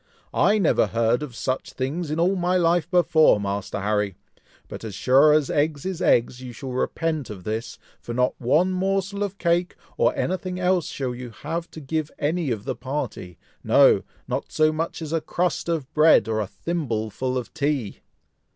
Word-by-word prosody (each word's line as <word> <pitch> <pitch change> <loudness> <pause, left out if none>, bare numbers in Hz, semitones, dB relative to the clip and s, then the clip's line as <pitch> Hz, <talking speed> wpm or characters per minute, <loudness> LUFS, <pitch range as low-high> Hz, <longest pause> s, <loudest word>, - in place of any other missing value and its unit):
"I 210 +2 +3
never 195 -6 +3
heard 115 +2 +1
of 140 -6 -6
such 130 +3 -3
things 145 +6 -3
in 155 +2 -2
all 180 +3 +3
my 180 0 +1
life 170 -1 +2
before, 165 - +4
Master 100 0 -3
Harry! 105 -2 0 0.5
but - - -8
as 110 -4 -6
sure 135 +7 +5
as 150 -2 +2
eggs 145 0 0
is 190 -3 -3
eggs, 120 +1 +2
you 125 -1 -8
shall 130 +3 -7
repent 155 +3 -2
of 100 -4 -8
this, 110 +4 -4 0.2
for - - -8
not 125 +1 +1
one 155 +10 +3
morsel 195 +2 -1
of 200 -1 -2
cake, 175 0 +1 0.2
or - - +2
anything 185 0 -2
else 180 -2 +1
shall 130 -3 -3
you 125 0 -7
have 165 +9 -5
to - - -10
give 155 +1 -2
any 155 +1 -1
of 110 -4 -2
the 130 -2 -2
party; 125 - -5 0.3
no! - - +5 0.3
not - - -3
so 155 0 +3
much 165 +1 -3
as 155 0 -5
a 165 - +1
crust 170 +2 -1
of 155 -4 -2
bread, 155 -8 +5
or 110 -1 0
a 105 - -2
thimbleful 130 - -3
of 125 - -5
tea!" 140 -8 -2
150 Hz, 185 wpm, -24 LUFS, 120-170 Hz, 0.5 s, sure